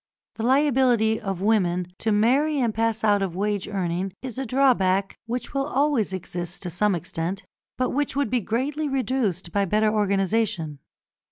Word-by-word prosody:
The - - -4
liability 250 -4 +3
of 195 -3 -4
women 185 -4 +2
to 225 - 0
marry 265 +9 +3
and 235 -5 +1
pass 225 0 0
out 205 -2 +3
of 185 -3 -2
wage 205 0 -1
earning 185 -1 -2
is 255 -1 -5
a 270 - -3
drawback 200 -7 +2
which 245 +2 -4
will 275 0 0
always 280 -8 +1
exist 175 -1 -5
to 175 - -4
some 200 +3 +1
extent, 170 +3 -4 0.3
but 255 0 0
which 290 +1 -1
would 280 -5 0
be 250 -2 +2
greatly 280 +9 -1
reduced 235 -9 -1
by 200 +2 +1
better 215 +3 +2
organisation. 200 -6 0
215 Hz, 165 wpm, -24 LUFS, 190-255 Hz, 0.3 s, liability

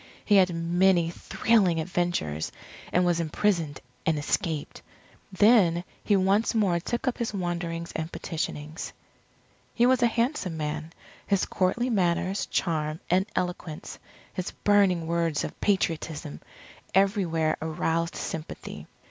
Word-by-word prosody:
He 205 - +5
had 185 -2 +5
many 170 0 +3
thrilling 190 -2 +2
adventures, 160 - -1 0.4
and 180 0 +3
was 175 -1 +2
imprisoned 165 -2 0 0.2
and 160 -1 +1
escaped. 150 +1 -2 0.5
Then 190 -4 +5 0.2
he 205 - +3
once 195 +4 +2
more 190 -6 +2
took 240 +9 -3
up 255 - 0
his 230 -3 -2
wanderings 170 -2 -3
and 160 +1 -3
petitionings. 155 -1 -4 0.8
He 240 - +4
was 255 0 +4
a 240 - +6
handsome 230 - -1
man. 155 +1 -3 0.4
His 200 -2 +2
courtly 240 +7 0
manners, 185 -1 +1
charm, 155 -2 -1
and 190 +2 +3
eloquence, 180 -3 -4 0.3
his 185 - -3
burning 195 -5 +3
words 165 -2 0
of - - -7
Patriotism, 160 - -1 0.5
everywhere 180 -5 +2
aroused 165 +1 -1
sympathy. 160 0 -6
175 Hz, 120 wpm, -27 LUFS, 160-195 Hz, 0.8 s, a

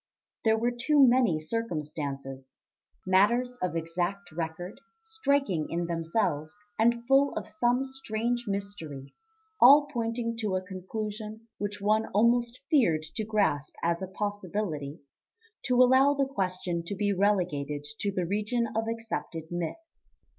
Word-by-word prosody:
There 220 -1 +4
were 235 +2 +1
too 275 +4 +4
many 240 -10 +3
circumstances 150 - -4 0.5
matters 235 +7 +3
of 180 -2 -1
exact 175 +4 -3
record, 170 +7 -5 0.2
striking 280 - 0
in 170 +1 -1
themselves 165 0 -1 0.2
and 235 +1 +2
full 275 +1 +4
of - - -4
some 240 +4 +1
strange 240 -2 -3
mystery, 195 -9 -5 0.5
all 285 +4 +9
pointing 230 -1 -2
to 210 -5 -1
a 185 0 -2
conclusion 215 +4 -6
which 205 0 -3
one 215 +2 +2
almost 235 +3 +3
feared 175 - +3
to 220 - -1
grasp 205 -9 0
as 170 +1 +1
a 190 - -3
possibility 190 -7 -4 0.6
to 250 - +2
allow 260 +3 +6
the 275 -1 +2
question 185 -8 -2
to 200 - -4
be 205 +1 +1
relegated 175 -8 0 0.2
to 200 - 0
the 185 -2 -1
region 210 +5 -1
of 225 0 0
accepted 225 -8 -4
myth. 175 - -3
205 Hz, 130 wpm, -28 LUFS, 170-235 Hz, 0.6 s, all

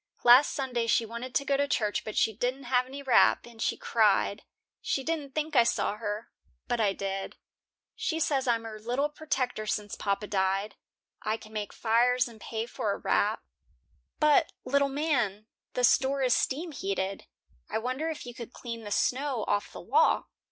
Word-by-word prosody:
Last 250 +4 +7
Sunday 250 -4 -1
she 230 0 +3
wanted 235 +3 -7
to 280 - +2
go 280 - +2
to 285 +1 +1
church, 210 -6 0
but 215 - -6
she 220 - +3
didn't 250 +5 -2
have 250 0 +1
any 280 +2 -8
wrap, 260 -3 +4
and 235 -2 -12
she - - 0
cried. 210 -2 +2 0.4
She 270 - -1
didn't 295 -3 -3
think 310 0 -2
I 245 - +8
saw 210 -2 0
her, 215 0 -4 0.4
but 240 -1 0
I 205 -2 +3
did. 195 0 -4 0.6
She 320 -3 -2
says 275 -4 +1
I'm 230 -1 +2
her 220 -1 -7
little 250 +7 -1
p'tector 255 -8 -2
since 205 -1 -2
papa 200 +1 -1
died. 195 +1 0 0.5
I 215 +1 -1
can 215 -1 -14
make 210 -1 -3
fires 245 +3 +2
and 225 -3 -13
pay 225 0 -3
for 240 - -2
a - - -4
wrap." - - +1 0.8
"But, 300 -1 +4
little 280 0 +2
man, 255 -9 0 0.3
the 250 - -1
store 270 +2 +3
is 250 -2 +4
steam 320 +6 0
heated. 195 -5 -3 0.4
I - - -1
wonder 255 +8 -2
if 310 -5 -6
you 245 - -7
could 235 0 -9
clean 230 -2 -6
the 205 - -6
snow 255 +1 0
off 205 - 0
the - - -9
walk." 470 +2 +3
240 Hz, 185 wpm, -29 LUFS, 215-275 Hz, 0.8 s, I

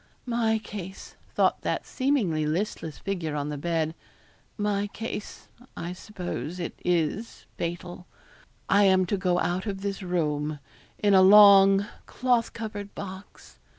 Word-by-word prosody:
'My 230 -2 +1
case,' 195 -3 -8 0.2
thought - - +2
that - - -2
seemingly 215 - 0
listless 160 -2 -3
figure 175 -6 -3
on 145 0 -2
the 150 - -3
bed; 160 0 -1 0.6
'my 205 -1 0
case 215 0 -7 0.3
I 175 +1 -4
suppose 180 -3 -6
it 170 - -4
is 180 +6 -1
fatal 175 +1 -5 0.6
I 200 +1 +5
am 190 -1 +4
to 190 - -1
go 180 -2 +1
out 185 +4 -1
of 195 -1 -4
this 200 0 -3
room 155 -4 -1 0.4
in 205 -1 +2
a 190 - +7
long 195 0 +8 0.2
cloth 245 -2 +1
covered 205 -3 -7
box. 190 0 -10
190 Hz, 135 wpm, -26 LUFS, 170-205 Hz, 0.6 s, long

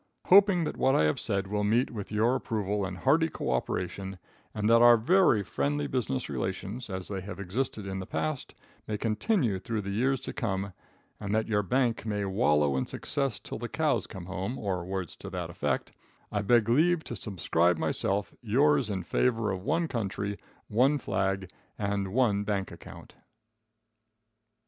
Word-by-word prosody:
Hoping 195 -2 +7
that - - -3
what 135 - +3
I - - +4
have 75 -1 +1
said 100 -3 -1
will 105 +1 -1
meet 115 +5 +2
with 105 -4 -6
your 110 +4 +2
approval 105 -5 -1
and 95 -1 -5
hearty 155 - +3
cooperation, 90 - -3 0.3
and 105 -1 -1
that 115 +1 +6
our 120 0 +8
very 125 - +4
friendly 145 +7 -1
business 130 -1 -2
relations, 95 +6 -4
as 95 -1 -4
they 95 -2 -4
have 95 -1 -8
existed 105 +2 -2
in 95 0 -4
the 95 - -6
past, 80 0 -3 0.3
may 105 - -2
continue 115 - 0
through 110 +2 -3
the 100 0 -4
years 130 +6 +1
to - - -6
come, 100 -3 -2 0.5
and 105 0 -2
that 110 - +1
your 105 -2 +2
bank 120 +3 +1
may 105 -2 -2
wallow 75 -7 +2
in 65 - -1
success 135 -5 -2
till - - -7
the 120 0 -5
cows 155 -2 0
come 95 -4 -8
home, 95 +7 -4
or 95 -6 -2
words 95 -1 -4
to - - -8
that - - -4
effect, - - -2 0.4
I 105 - 0
beg 115 +1 +3
leave 160 +7 +3
to - - -6
subscribe 90 -3 +1
myself, 100 +4 -1
yours 135 +2 +3
in 95 -3 -2
favor 115 +3 +1
of 95 -1 -3
one 165 - 0
country, 100 -5 -3 0.3
one 130 +7 +3
flag 95 -5 -1 0.3
and 100 -2 -1
one 110 -4 +2
bank 100 -2 -2
account. 85 - -12
105 Hz, 175 wpm, -29 LUFS, 95-125 Hz, 0.5 s, our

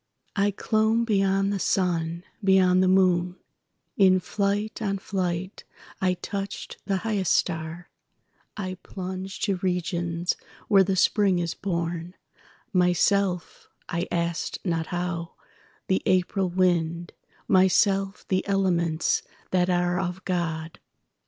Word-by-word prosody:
I 200 -1 +3
clomb 220 +3 +1
beyond 195 -2 +2
the 200 - -2
sun, 170 -3 0 0.2
beyond 185 -1 +5
the 185 - +3
moon; 180 -1 +3 0.6
In 185 -2 +5
flight 205 +3 -2
on 200 -2 0
flight 185 -1 -3 0.4
I 185 -1 +2
touched 195 +3 -5
the 195 -2 +1
highest 205 -5 0
star;I 175 +3 -5
plunged 190 0 -6
to 200 -3 +1
regions 175 -1 -1 0.3
where 195 -2 +6
the 190 0 0
Spring 195 0 +3
is 170 -1 -1
born, 170 -1 -3 0.6
Myself 180 0 +1 0.2
(I 170 0 -2
asked 170 -1 -1
not 165 -3 -1
how) 175 -1 -3 0.5
the 190 - +1
April 185 +1 +2
wind, 175 -2 0 0.3
Myself 195 +1 +3
the 185 -1 +1
elements 175 -5 +1 0.3
that 180 -1 +2
are 175 0 +1
of 185 0 -4
God. 165 -3 -2
185 Hz, 115 wpm, -26 LUFS, 175-195 Hz, 0.6 s, where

